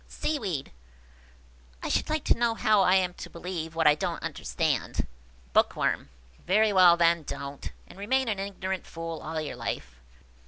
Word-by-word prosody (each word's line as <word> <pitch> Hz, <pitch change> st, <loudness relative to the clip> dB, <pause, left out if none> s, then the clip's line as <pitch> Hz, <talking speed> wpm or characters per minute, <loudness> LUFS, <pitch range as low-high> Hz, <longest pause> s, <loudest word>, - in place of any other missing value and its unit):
Seaweed. 195 Hz, -, -3 dB, 0.5 s
" -, -, -25 dB
I -, -, -2 dB
should -, -, 0 dB
like 310 Hz, -1 st, 0 dB
to -, -, +4 dB
know 235 Hz, -1 st, +1 dB
how 215 Hz, -2 st, +4 dB
I 185 Hz, 0 st, +5 dB
am 180 Hz, -2 st, +2 dB
to -, -, -9 dB
believe 170 Hz, -2 st, -5 dB
what 165 Hz, -1 st, +1 dB
I 150 Hz, -, +8 dB
don't 150 Hz, -, -3 dB
understand." -, -, -1 dB, 0.5 s
Bookworm. -, -, +2 dB, 0.3 s
"Very 210 Hz, +3 st, +3 dB
well, 180 Hz, -2 st, +7 dB
then, 170 Hz, 0 st, +4 dB
don't! 140 Hz, -1 st, -6 dB
and 190 Hz, -, -14 dB
remain 260 Hz, +5 st, +1 dB
an 210 Hz, -3 st, -1 dB
ignorant 190 Hz, -1 st, -4 dB
fool 165 Hz, -1 st, -6 dB
all 160 Hz, -, -4 dB
your 155 Hz, -2 st, -4 dB
life. 60 Hz, 0 st, -5 dB
175 Hz, 165 wpm, -28 LUFS, 150-200 Hz, 0.5 s, I